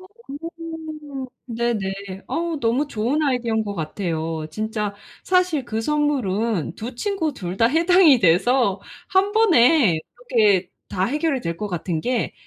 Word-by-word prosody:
어. 375 - -13 1.4
네네. 235 -1 -1 0.5
어우 330 -3 -2
너무 245 +6 +1
좋은 245 +6 0
아이디어인 235 -5 0
것 205 -1 -4
같아요. 160 -1 -3
진짜 215 +1 -3 0.3
사실 365 -6 +2
그 225 -2 -3
선물은 230 - 0
2 240 +4 -6
친구 335 - -1
2 180 0 -5
다 225 - +4
해당이 330 0 +5
돼서 200 +4 +3 0.3
1 385 +2 +2
번에 300 - +5 0.3
이렇게 205 -7 +3 0.2
다 185 - -1
해결이 295 +2 0
될 170 -4 -3
것 210 +4 -4
같은 175 -2 -2
게 245 +4 -1
235 Hz, 230 characters per minute, -22 LUFS, 195-295 Hz, 1.4 s, 해당이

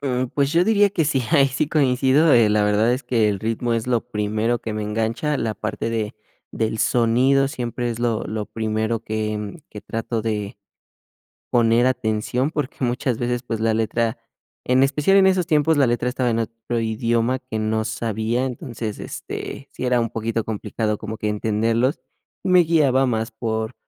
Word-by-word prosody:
Mm, 130 -2 -1
pues, 140 0 +1
yo 170 +1 +4
diría 205 -2 +4
que 170 -5 0
sí, 140 -3 +1
ahí 140 -4 +5
sí 145 +3 -1
coincido, 140 +1 +3
eh, 115 -4 +6
la 105 0 +2
verdad 105 +3 +3
es 130 +2 -2
que 115 -6 +2
el 100 -2 -2
ritmo 115 +1 -1
es 115 0 -2
lo 120 -2 +2
primero 110 +1 -1
que 110 - -4
me 105 0 -3
engancha, 115 +8 -1
la 115 -4 -2
parte 110 +2 -3
de 110 -2 -2 0.4
del 110 -1 -2
sonido 125 +5 +3
siempre 120 -3 -3
es 115 - -5
lo 120 -2 0
lo 105 -1 -4
primero 110 0 -2
que 110 +3 -4
que 105 - -9
trato 115 0 -3
de 105 -2 -3 0.9
poner 115 0 +3
atención, 125 +3 -1
porque, 150 -5 -3
muchas 125 0 0
veces, 120 +1 -2
pues, 115 -2 -3
la 110 0 +2
letra, 115 +1 0 0.5
en 130 +1 +4
especial 150 +8 +3
en 190 -1 +6
esos 185 -3 +2
tiempos, 155 -1 +3
la 140 -3 +4
letra 120 +1 0
estaba 125 -1 0
en 115 -1 0
otro 115 +1 -3
idioma 115 +3 0
que 125 -3 -6
no 110 0 0
sabía, 110 +2 -1
entonces, 120 -5 -5
este, 140 - -7
sí - - -5
era 125 -1 +2
un 115 - -1
poquito 115 0 -2
complicado 110 0 -2
como 110 +1 -6
que 105 - -2
entenderlos, 115 +5 0 0.4
y - - -1
me 180 0 +6
guiaba 145 -6 +3
más 115 -2 -1
por 110 0 -3
115 Hz, 185 wpm, -22 LUFS, 110-130 Hz, 0.9 s, eh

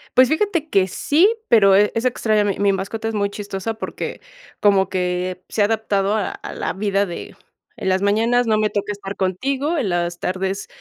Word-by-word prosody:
Pues 255 0 +7
fíjate 330 -1 0
que 190 -6 +3
sí, 310 - +3 0.2
pero, 200 -5 +6
e 205 +1 +4
es 230 +2 -1
extraña 215 -4 +2
mi 200 -2 -1
mi 200 -1 +3
mascota, 205 +4 -4
es 225 - -2
muy 200 -1 0
chistosa 205 +1 -5
porque 220 - -6 0.4
como 195 -2 +3
que 180 0 -2
se 215 - -1
ha - - +5
adaptado 205 -2 0
a 210 -3 -1
a - - -8
la - - -3
vida 200 0 0
de 175 - -8 0.5
en - - -2
las 190 0 +2
mañanas, 225 +5 +2
no 220 -2 +2
me 215 0 +1
toca 205 0 -2
estar 200 -1 -6
contigo, 270 - -1
en 255 -9 0
las 175 -1 -1
tardes 190 +2 -2
205 Hz, 200 wpm, -21 LUFS, 190-225 Hz, 0.5 s, Pues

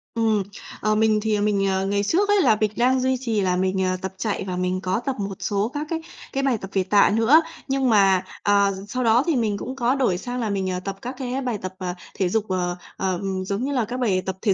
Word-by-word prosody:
Ừm, 220 -3 +2 0.4
ờ, 215 0 +2
mình 215 0 +3
thì, 215 0 +1
ờ, 205 - 0
mình, 205 -1 +1
ờ, 190 0 0
ngày 200 +1 0
trước 375 - +1
ấy 410 -1 +4
là 220 - +5
mình 215 -1 +2
đang 255 +2 +3
duy 260 0 +1
trì 230 -5 -1
là 185 -1 +1
mình, 190 +1 0
ờ, 185 0 0
tập 190 -1 -4
chạy 210 +1 -2
và 180 - -2
mình 180 +1 -1
có 185 +3 0
tập 270 - -1
một 195 -1 -3
số 205 +2 -1
các 295 +1 -3
cái 325 -1 -2 0.3
cái 275 - 0
bài 265 -4 +2
tập 195 -2 -8
về 190 - +2
tạ 200 +2 +4
nữa. 235 +9 +6 0.3
Nhưng 270 -1 +1
mà, 195 -4 +4 0.2
ờ, 200 -1 +3
sau 255 +5 -2
đó 230 +2 +4
thì 330 - +2
mình 220 -5 0
cũng 260 - -6
có 250 0 +1
đổi 250 -10 +1
sang 245 +6 -5
là 225 -3 -1
mình, 195 -2 -1
ờ, 180 - -2
tập 195 +1 -5
các 250 +2 -5
cái 260 +1 -3
bài 245 -4 -2
tập, 185 0 -5
ờ, 180 -1 -3 0.2
thể 185 -2 0
dục, 215 +2 0
ờ, 180 -1 -1 0.2
ờ, 190 -1 0
ừm, 190 -1 -2
giống 200 +4 -2
như 275 - -1
là 250 -5 +1
các 245 +3 -5
bài 200 -7 +1
tập 190 - -3
thể 205 -4 +3
210 Hz, 275 wpm, -23 LUFS, 190-250 Hz, 0.4 s, nữa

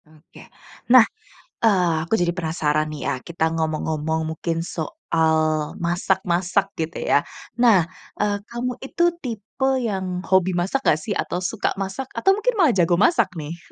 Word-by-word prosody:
Oke. 155 +1 -17 0.5
Nah, 245 -2 +8 0.5
eee, 185 -7 +3
aku - - -3
jadi 175 -4 +1
penasaran 155 -3 -1
nih 155 -1 -7
ya, - - 0
kita 160 +2 -2
ngomong-ngomong 160 0 -1
mungkin 165 +1 -2
soal 165 - -1 0.4
masak-masak, 180 +2 0
gitu 160 +1 -3
ya. - - +4 0.4
Nah, 225 -8 +6 0.4
eee, 205 -1 +1
kamu 240 +1 -3
itu 270 +6 -2 0.2
tipe 235 +2 -2
yang 185 -4 -3
hobi 190 -1 +2
masak 180 +10 0
nggak 155 - +4
sih? - - -5
Atau 180 +1 -2
suka 205 +3 -1
masak, 195 +7 -4
atau 385 - +3
mungkin 480 +4 0
malah 340 -10 +4
jago 175 0 +4
masak 210 - +3
nih? 155 +3 -6
180 Hz, 150 wpm, -22 LUFS, 165-220 Hz, 0.5 s, Nah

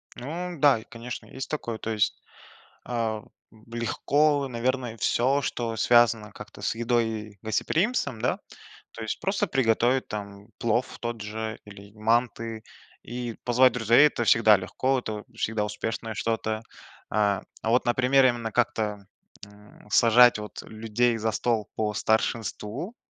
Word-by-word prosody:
Ну 175 +7 -5
да, 140 -6 +5
и - - -12
конечно. 120 +1 -8
Есть 135 - -7
такое. 120 -7 -3
То 115 - -4
есть, 105 -2 0 0.6
а, 115 -3 -2 0.5
легко, 140 +5 +1
наверное, 125 -1 -2
всё, 130 +6 +2
что 115 -3 -3
связано 115 -2 +4
как-то 105 0 -11
с 105 - -1
едой 120 0 +1
и 105 -2 -6
гостеприимством, 140 - 0
да. - - 0 0.5
То - - -10
есть 110 - -3
просто 195 -1 0
приготовить 125 -1 +2
там 100 0 -7
плов 120 +2 0
тот 120 -2 -4
же 110 +1 -5
или 100 0 -13
манты 115 0 0 0.4
и 120 -1 -5
позвать 125 0 +4
друзей- 120 +5 +5
это 120 - -2
всегда 110 -2 +6
легко, 130 +8 -1
это 105 -3 -5
всегда 105 -1 -1
успешное 110 +2 -4
что-то. 110 0 -1 0.5
А, 100 -2 +1 0.2
а 110 - -2
вот, 125 +2 +3
например, 130 +2 +4
именно 120 -3 +1
как-то, 105 -3 -1 0.4
м, 105 +1 -18
сажать 120 0 +6
вот 105 0 -7
людей 115 +2 0
за 110 0 -1
стол 110 -1 -1
по 105 -1 -1
старшинству, 110 - -1
115 Hz, 140 wpm, -26 LUFS, 110-125 Hz, 0.6 s, всегда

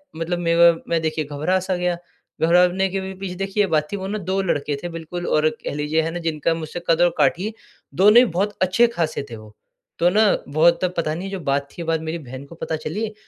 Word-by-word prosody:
मतलब 170 +2 -2
मेरा 170 0 +5
मैं 165 -1 +1
देखिए 155 -1 -2
घबरा 150 +6 0
सा 185 0 -2
गया, 180 -1 -1 0.4
घबराने 180 +3 +4
के 195 +1 -2
भी 190 0 -6
पीछे 185 -1 -6
देखिए 195 +2 0
ये 195 - 0
बात 150 -1 +1
थी 205 - -2
वो 190 0 -5
ना 210 +2 -2
दो 190 0 -1
लड़के 150 -5 -1
थे 175 - -3
बिल्कुल 165 +1 -6
और 155 +1 +3
कह 155 - -7
लीजिए 150 +2 0
है 165 +1 -2
ना 175 - -4
जिनका 165 -1 0
मुझसे 165 +1 -5
कद 165 +1 +4
और 175 - +6
काठी 175 +9 +1 0.4
दोनों 210 +4 +6
ही 250 - +8
बहुत 200 +1 -2
अच्छे 185 +6 +4
खासे 155 -4 -1
थे 115 - -7
वो। 110 0 -14 0.4
तो 175 - +4
ना 215 +4 +3 0.3
बहुत 165 +3 +4
तब 180 -1 0
पता 155 -2 0
नहीं 190 +3 -5
जो 195 - -4
बात 140 -2 -1
थी 170 - -7
बाद 160 -1 -1
मेरी 160 +1 -4
बहन 130 -1 -9
को 170 - -13
पता 160 -1 -3
चली, 210 +8 -4
170 Hz, 240 wpm, -22 LUFS, 155-190 Hz, 0.4 s, ही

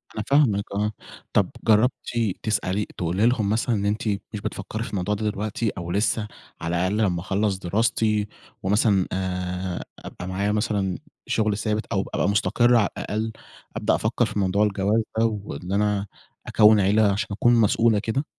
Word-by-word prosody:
أنا 110 - -2
فاهمِك 130 -9 +3
آه. 105 +1 0 0.4
طب 100 - +3
جرّبتِ 115 +3 +4 0.5
تسألي 105 -2 0
تقولي 90 +5 0
لهم 115 -4 +2
مثلًا 115 +2 +1
إن 100 -1 -1
أنتِ 105 +2 -1 0.3
مش 105 - -4
بتفكّري 110 +4 -4
في - - -6
الموضوع 100 +1 -1
ده 105 +1 -1
دلوقتي 105 +2 -2
أو 85 0 -5
لسّه 105 +2 0 0.3
على 85 +2 -2
الأقل 95 +4 0
لمّا 90 -6 +1
أخلّص 100 +1 0
دراستي 105 +2 +1 0.4
ومثلًا 100 -1 +3
آآ 90 -1 -3 0.2
أبقى 90 - -8
معايا 100 +2 -1
مثلًا 105 -4 0 0.3
شغل 105 -2 +1
ثابت 110 0 -1
أو 95 - +1
أبقى - - +1
مستقرة 120 +4 +3
على 105 - +2
الأقل، 110 +2 -2 0.4
أبدأ - - +1
أفكّر - - +1
في 105 - -3
موضوع 95 +2 +2
الجواز 105 +2 +1 0.2
ده، 115 - +4
وإن 100 -5 -4
أنا 105 0 +1 0.4
أكوِّن 105 -1 +6
عيلة 100 +1 +4
عشان 110 +4 -1
أكون 120 +4 +3
مسؤولة 110 0 +3
كده؟ 115 +7 -1
105 Hz, 165 wpm, -24 LUFS, 95-110 Hz, 0.5 s, أكوِّن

